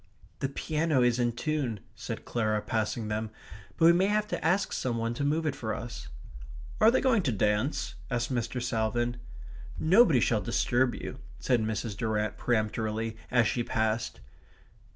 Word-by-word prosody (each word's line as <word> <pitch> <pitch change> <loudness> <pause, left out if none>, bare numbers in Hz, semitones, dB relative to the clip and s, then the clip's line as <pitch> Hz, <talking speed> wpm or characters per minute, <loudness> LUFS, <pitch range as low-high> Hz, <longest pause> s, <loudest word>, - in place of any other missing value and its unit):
"The 135 - -1
piano 150 -1 +1
is 120 0 +2
in 120 -1 +1
tune," 135 -5 -2
said - - -6
Clara, 110 -3 0
passing 110 0 -1
them, 110 +1 -2 0.5
"but 165 - +4
we 170 - +8
may 185 +3 +3
have 210 +1 +1
to - - -3
ask 190 +5 +2
some 120 -2 -1
one 115 0 -1
to 130 - -3
move 155 +3 +1
it 150 - 0
for 110 -2 -3
us." 115 - -7 0.7
"Are 220 - +7
they 250 - +3
going 250 -6 +3
to 135 - 0
dance?" 105 +6 0 0.2
asked 120 0 -1
Mr. 120 +1 -2
Salvin. 120 +1 -1 0.6
"Nobody 175 - +5
shall 110 -2 +2
disturb 120 +2 +1
you," 130 - -7 0.2
said 125 -3 +1
Mrs. 110 -1 -2
Durrant 110 -1 -1
peremptorily 110 -1 -1
as 120 -2 +4
she 120 - 0
passed. 110 0 -1
120 Hz, 165 wpm, -29 LUFS, 110-145 Hz, 0.7 s, we